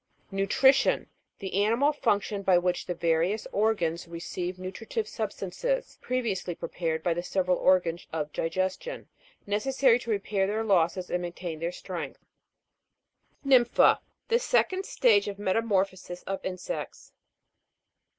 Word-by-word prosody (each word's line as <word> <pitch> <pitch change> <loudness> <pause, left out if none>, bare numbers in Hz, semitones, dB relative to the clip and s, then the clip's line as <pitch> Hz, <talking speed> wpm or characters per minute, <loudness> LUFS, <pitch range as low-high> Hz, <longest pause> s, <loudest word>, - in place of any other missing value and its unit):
NUTRI'TION. 265 +8 +3 0.3
The 195 +1 -1
animal 245 +8 +3
function, 205 -6 0
by 190 -2 +4
which 180 0 0
the 180 - -2
various 170 +5 +1
organs 175 -6 0
re 170 0 -7
ceive 180 +1 -4
nutritive 195 - -4
substances - - -3
(previ 250 -3 -1
ously 180 -2 -4
prepared 160 -2 -3
by 175 - +2
the 175 - -2
several 180 0 +1
or 185 0 +5
gans 170 0 -5
of 150 -2 -3
digestion), 185 - -2 0.4
necessary 245 +4 +3
to 235 - -9
repair 200 -2 0
their 215 +2 -1
losses 180 -3 +1
and 180 - 0
maintain 175 -2 -5
their 170 +2 -2
strength. - - -7 1.2
NYM'PHA. 255 -3 +5 0.3
The 470 +1 +4
second 390 -6 +1
stage 210 -5 +3
of 200 -1 -4
metamorphosis 190 -3 -1
of 195 0 -4
insects. 185 - -5
195 Hz, 130 wpm, -28 LUFS, 175-225 Hz, 1.2 s, or